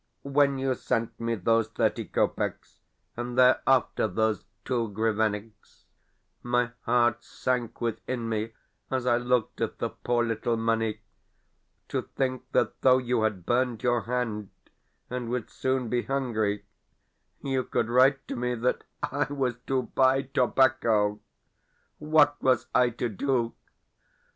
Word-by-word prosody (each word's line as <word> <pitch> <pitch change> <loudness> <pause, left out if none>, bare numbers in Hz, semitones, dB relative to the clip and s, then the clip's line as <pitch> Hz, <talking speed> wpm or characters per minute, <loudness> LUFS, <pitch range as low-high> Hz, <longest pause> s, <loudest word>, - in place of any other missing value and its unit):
When 140 0 +2
you 135 0 0
sent 115 -2 -2
me 115 0 -1
those 115 +3 +2
thirty - - 0
kopecks, - - -2 0.4
and 120 +1 -5
thereafter 130 -2 +4
those 110 -3 0 0.2
two 120 -4 0
grivenniks, 110 0 -2 0.6
my 120 0 0
heart 120 -1 +2
sank 125 -3 -2
within 120 +1 -3
me 110 0 -2 0.4
as 130 -2 -1
I 120 -1 +3
looked 120 -2 0
at - - -2
the - - -2
poor 120 -1 0
little 115 +1 -1
money. 115 -1 0 0.9
To - - -1
think 130 -1 -3
that - - 0
though 130 -1 +6
you 125 -2 0
had 105 -5 -1
burned 120 -2 0
your 120 -1 +2
hand, 115 -4 -2 0.6
and 125 -1 -4
would 125 -2 -3
soon 130 -1 -1
be 120 +1 0
hungry, 110 -7 -1 0.8
you 135 -2 0
could 115 - -1
write 130 +3 +3
to - - -3
me 125 0 -1
that 120 +2 0 0.2
I 145 +1 0
was 130 -4 -1
to 130 -1 +1
buy 130 +2 +2
tobacco! 125 -6 +2 0.8
What 150 -1 +3
was 130 -1 +3
I 125 -1 +4
to 120 +1 -3
do? 120 +1 -1
120 Hz, 135 wpm, -27 LUFS, 115-130 Hz, 0.9 s, though